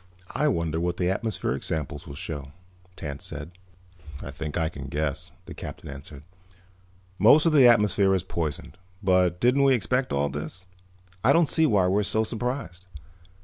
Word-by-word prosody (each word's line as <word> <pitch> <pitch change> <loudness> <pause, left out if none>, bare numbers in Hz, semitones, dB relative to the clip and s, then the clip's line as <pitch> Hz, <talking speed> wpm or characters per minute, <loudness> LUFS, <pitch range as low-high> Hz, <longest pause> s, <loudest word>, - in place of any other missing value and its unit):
"I 150 - +1
wonder 85 - 0
what 85 +1 -1
the 90 0 +1
atmospheric 95 - -2
sample 75 -2 -3
will 70 - -8
show," 70 -1 -6 0.4
Tance 70 -4 -6
said. 75 +4 -6 0.7
"I - - -7
think 75 0 -5
I 80 -2 +1
can 70 -4 -7
guess," 75 +4 -2 0.2
the - - -9
Captain - - -8
answered. 70 +1 -10 1.0
"Most 145 +10 +6
of 165 - +3
the 135 -5 +7
atmosphere 105 -4 +4
is 90 - -1
poisoned. 80 -1 -4 0.2
But 90 -2 +3
didn't 125 +5 +3
we 135 -1 +5
expect 125 +4 -1
all 70 +1 +1
this? 80 +6 -6 0.6
I 125 - +5
don't 165 0 +4
see 160 +2 +3
why 100 -7 +3
we're 95 +3 +2
so 110 +2 +1
surprised. 115 -6 -4
90 Hz, 165 wpm, -26 LUFS, 75-115 Hz, 1.0 s, the